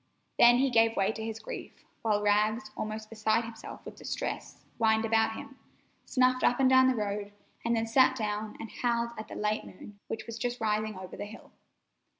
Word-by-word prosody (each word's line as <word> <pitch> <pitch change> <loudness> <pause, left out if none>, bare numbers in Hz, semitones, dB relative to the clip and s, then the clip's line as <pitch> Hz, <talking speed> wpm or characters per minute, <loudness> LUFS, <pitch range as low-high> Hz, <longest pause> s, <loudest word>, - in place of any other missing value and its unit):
Then 240 0 +8
he 270 +1 +2
gave 225 -1 +4
way 195 +1 +3
to 220 0 -6
his 225 0 -4
grief, 220 - -9 0.2
while 210 -2 +1
Rags, 215 +1 +2
almost 215 0 -4
beside 220 +1 +1
himself 225 -1 -9
with - - -9
distress, - - -5
whined 220 0 +3
about 225 0 +2
him, 275 0 -10 0.5
snuffed 255 0 +2
up 245 - +3
and 265 - +5
down 260 0 +6
the 260 - +3
road, 205 -1 -3 0.3
and 235 0 +1
then 225 0 0
sat 260 +3 +4
down 210 -1 -3
and 225 - -7
howled 235 -1 +1
at 215 - -6
the - - -8
late 210 +1 -1
moon, 200 +2 -12
which 220 0 -5
was 230 -1 -7
just 245 +1 -2
rising 215 -1 0
over 185 -1 -8
a - - -4
hill. 215 +2 -12
225 Hz, 195 wpm, -30 LUFS, 215-235 Hz, 0.5 s, Then